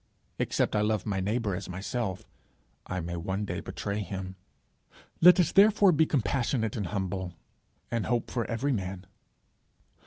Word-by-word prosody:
Except - - 0
I 105 - +3
love 105 -2 0
my 100 -2 -1
neighbour 105 +1 -1
as 95 +1 -6
myself, 95 +2 -3 0.6
I 90 0 -3
may 85 +1 -4
one 95 +5 -2
day - - -3
betray 100 +1 -4
him! 95 -2 -5 0.9
Let 180 +2 +8
us 175 - +3
therefore 205 -1 +6
be 160 -1 +3
compassionate 120 -3 0
and 105 -6 -2
humble, 95 -2 -3 0.6
and 115 -2 -1
hope 120 -1 -1
for 120 -3 -1
every 125 +5 -1
man. 95 -3 -4
105 Hz, 150 wpm, -29 LUFS, 95-125 Hz, 0.9 s, Let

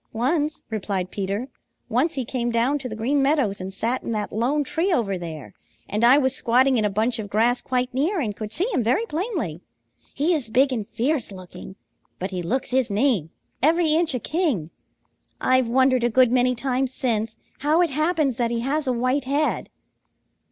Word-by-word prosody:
"Once," 295 +6 -1
replied 195 -4 -2
Peter. 200 +5 -3 0.4
"Once 260 +8 +1
he 260 -3 -2
came 240 0 -2
down 240 +5 +1
to 260 -2 -5
the 215 - -5
Green 265 +6 +1
Meadows 270 -9 +1
and 185 +1 -5
sat 230 +6 -1
in - - -7
that 210 -1 -2
lone 260 +7 0
tree 345 +6 -1
over 220 - +1
there, 160 - -7 0.3
and 210 +3 -2
I 250 +4 +7
was 260 -3 +2
squatting 255 0 +3
in - - +1
a 210 - +2
bunch 225 +4 0
of 205 -2 -5
grass 230 +4 +2
quite 250 0 -1
near 325 +9 0
and 215 -8 -2
could 215 -1 -6
see 340 - +1
him - - +2
very 250 - +1
plainly. 315 - -3 0.5
He 310 +6 +2
is 280 -9 -1
big 265 +4 +3
and 215 -5 -3
fierce 260 -1 -1
looking, 185 0 -10 0.4
but 190 +2 -4
he 185 -1 -3
looks 250 +11 -2
his 255 -2 +2
name, 205 - +1 0.3
every 320 +2 +3
inch 325 -3 +2
a - - -1
king. 260 - -1 0.7
I've 255 -1 +3
wondered 255 +1 +3
a 240 - +3
good 250 +1 +4
many 250 0 +3
times 260 +1 -1
since 225 -4 -1 0.2
how 300 +5 +2
it 335 - -1
happens 305 -3 +1
that 235 -1 +1
he 235 0 -1
has 285 +4 -1
a 255 - +2
white 255 +3 0
head." 285 +3 0
250 Hz, 195 wpm, -23 LUFS, 220-285 Hz, 0.7 s, I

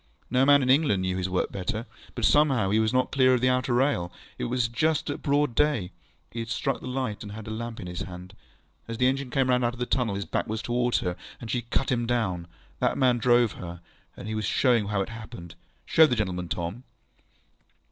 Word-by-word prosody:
No 130 +2 +3
man 140 -1 +6
in 130 - 0
England 130 -10 +3
knew 90 0 -1
his 95 0 -2
work 90 - -1
better. 110 +4 -3 0.3
But - - 0
somehow 135 -10 +3
he 110 - +3
was 110 0 +2
not 130 0 +1
clear 130 -2 +4
of 120 - -1
the 130 - +4
outer 125 0 +1
rail. 120 -10 +1 0.3
It - - -1
was 120 0 0
just 145 +6 0
at - - -6
broad 145 -2 +1
day. 130 -9 +1 0.4
He 115 - -6
had 115 0 -4
struck 135 +3 -1
the - - -7
light, 125 -5 -3
and 105 -1 -7
had 110 0 -8
the 110 - -6
lamp 115 +1 -5
in 95 - -6
his 90 0 -6
hand. 90 +2 -8 0.5
As 115 0 -5
the 125 - +2
engine 135 0 0
came 130 0 +1
out 125 0 +3
of 120 0 -1
the 125 - -1
tunnel, 120 -5 0
his 100 -1 -3
back 85 - -2
was 110 0 -3
towards 120 0 +1
her, 90 -1 -2 0.2
and 115 - -6
she 125 - 0
cut 120 +3 -1
him 120 -2 0
down. 95 -8 -1 0.3
That - - +1
man 125 -3 +3
drove 120 -1 +4
her, 85 -1 -8 0.4
and 110 +2 -5
was 110 -1 -2
showing 115 -2 +2
how 105 -1 0
it - - -9
happened. 110 -7 -9 0.3
Show 160 -1 +6
the 125 - 0
gentleman, 90 -5 -2
Tom. 85 +10 -4
120 Hz, 230 wpm, -27 LUFS, 100-130 Hz, 0.5 s, man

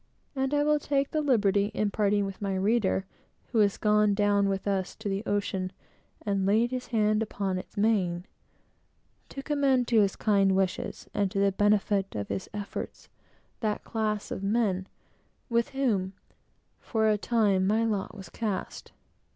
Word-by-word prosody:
And 265 0 0
I 290 0 +2
will 300 0 +3
take 280 -1 0
the 310 - 0
liberty, 205 -7 +2
on 210 -1 0
parting 205 -1 +1
with 195 0 -7
my 195 -1 -1
reader, 195 -1 +1 0.5
who 235 - +2
has 200 -2 +3
gone 210 -1 +3
down 205 -1 +2
with 195 +1 -2
us 195 -2 -1
to 220 - -7
the 195 0 -1
ocean, 195 -2 -1 0.5
and 200 -2 0
"laid 225 +4 +3
his 255 -1 -4
hand 215 -2 +2
upon 200 -4 -2
its 195 - -12
mane," 190 -5 +1 1.0
to 275 - -7
commend 275 -4 +2
to 225 -3 +5
his 195 -2 +1
kind 195 -3 +3
wishes, 190 -1 -2
and 200 -1 +1
to 195 - -5
the 200 0 +3
benefit 205 -1 +1
of 100 -1 -4
his 190 - -4
efforts, 205 -1 -6 0.5
that 215 -3 -2
class 215 -2 -2
of - - -4
men 195 -3 0 0.6
with 235 0 +2
whom, 215 -9 0 0.7
for 220 -2 0
a 215 - +4
time, 205 -3 +2
my 220 +3 +2
lot 210 -1 -2
was 190 - -9
cast. 210 -5 -4
205 Hz, 165 wpm, -28 LUFS, 195-225 Hz, 1.0 s, to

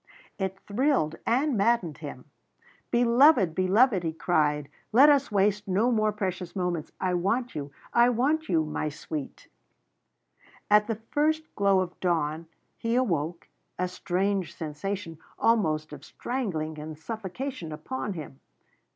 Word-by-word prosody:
It 190 0 -2
thrilled 205 - +1
and 265 +4 +2
maddened 200 -6 +1
him. 145 -4 -8 0.6
"Beloved, 240 - +5
beloved!" 190 +4 +3
he 165 -2 -2
cried, 150 -4 +1 0.2
"let 265 +7 +7
us 280 -3 +2
waste 205 0 +1
no 205 +6 +2
more 215 -2 +2
precious 185 -4 -4
moments. 175 -4 -2
I 185 -1 0
want 225 +8 0
you 145 -1 -5 0.2
I 240 +1 +6
want 285 +7 +1
you 160 -3 +2
my 155 0 -2
sweet!" 150 -1 -7 1.2
At 210 0 +6
the 225 - -1
first 305 +8 -1
glow 195 -2 +3
of 180 -1 -5
dawn, 165 -2 -1 0.3
he 230 +1 -1
awoke, 170 - -1 0.3
a 180 - 0
strange 190 +1 -1
sensation, 165 +2 -5 0.2
almost 155 -10 +1
of 145 -1 -10
strangling 160 - -4
and 155 0 -7
suffocation, 220 - -5
upon 200 +8 -4
him. 150 -5 -8
190 Hz, 135 wpm, -27 LUFS, 160-235 Hz, 1.2 s, let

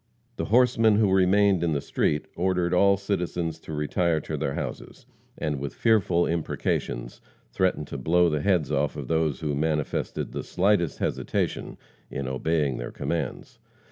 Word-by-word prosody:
The - - -2
horsemen 115 -2 +4
who 105 -2 +3
remained 95 -1 +4
in 85 -2 +1
the 70 - 0
street 75 +1 0
ordered 90 -1 0
all 100 +2 +5
citizens 90 -4 -2
to 80 - -10
retire 80 +2 0
to - - -4
their 70 - -2
houses, - - -6 0.3
and, 75 -3 -2
with 70 -2 -5
fearful 95 -6 +3
imprecations, 75 -6 -2 0.3
threatened 90 +1 0
to 70 - -5
blow 85 +6 +3
the 75 -3 0
heads 85 -7 +1
off 75 0 0
those 75 +1 -1
who 75 -2 -1
manifested 75 0 -2
the - - -4
slightest 90 -3 +1
hesitation 65 0 -2 0.3
in 70 -1 -4
obeying 70 0 0
their - - -5
commands. 85 - -4
85 Hz, 150 wpm, -26 LUFS, 75-95 Hz, 0.3 s, all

